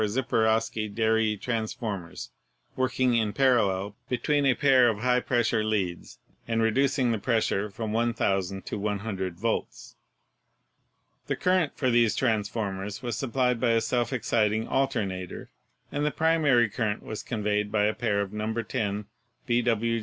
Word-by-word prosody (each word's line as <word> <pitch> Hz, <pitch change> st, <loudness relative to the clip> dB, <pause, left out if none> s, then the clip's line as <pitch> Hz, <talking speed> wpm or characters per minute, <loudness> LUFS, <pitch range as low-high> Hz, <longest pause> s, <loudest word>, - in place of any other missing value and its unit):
Ziperowsky 110 Hz, -1 st, 0 dB
Deri 110 Hz, 0 st, +1 dB
transform 110 Hz, -4 st, -3 dB
ers 85 Hz, -, -9 dB, 0.4 s
working 130 Hz, -1 st, +1 dB
in 110 Hz, -3 st, +1 dB
parallel 105 Hz, -7 st, +2 dB
between 140 Hz, +3 st, +1 dB
a 130 Hz, -, +4 dB
pair 130 Hz, -4 st, +5 dB
of 110 Hz, -, -1 dB
high 125 Hz, +3 st, +2 dB
pressure 120 Hz, -3 st, +1 dB
leads, 100 Hz, -5 st, -2 dB, 0.3 s
and 115 Hz, -1 st, 0 dB
reducing 125 Hz, +2 st, +2 dB
the 110 Hz, -, -1 dB
pressure 110 Hz, -3 st, 0 dB
from 110 Hz, +2 st, -5 dB
1,000 100 Hz, -5 st, 0 dB
to -, -, -4 dB
100 100 Hz, -3 st, -3 dB
volts. 115 Hz, +4 st, -3 dB, 1.3 s
The -, -, 0 dB
current 180 Hz, -5 st, +1 dB
for 130 Hz, -3 st, +1 dB
these 120 Hz, -2 st, +3 dB
transformers 105 Hz, -2 st, -2 dB
was 120 Hz, -1 st, -2 dB
supplied 125 Hz, -2 st, 0 dB
by 120 Hz, -1 st, +2 dB
a 115 Hz, -, +4 dB
self 120 Hz, +1 st, 0 dB
exciting 110 Hz, -3 st, 0 dB
alternator, 105 Hz, -10 st, -2 dB, 0.4 s
and 145 Hz, -, -2 dB
the 150 Hz, -, +2 dB
primary 150 Hz, -7 st, +3 dB
current 105 Hz, 0 st, -2 dB
was 110 Hz, -, -6 dB
convened 105 Hz, -2 st, -1 dB
by 105 Hz, -1 st, +2 dB
a 105 Hz, +1 st, +2 dB
pair 105 Hz, -4 st, 0 dB
of 100 Hz, 0 st, -5 dB
No. 105 Hz, +1 st, -2 dB
10 105 Hz, -2 st, -2 dB, 0.4 s
B. 120 Hz, 0 st, +2 dB
W. 115 Hz, -1 st, +1 dB
115 Hz, 145 wpm, -27 LUFS, 105-125 Hz, 1.3 s, pair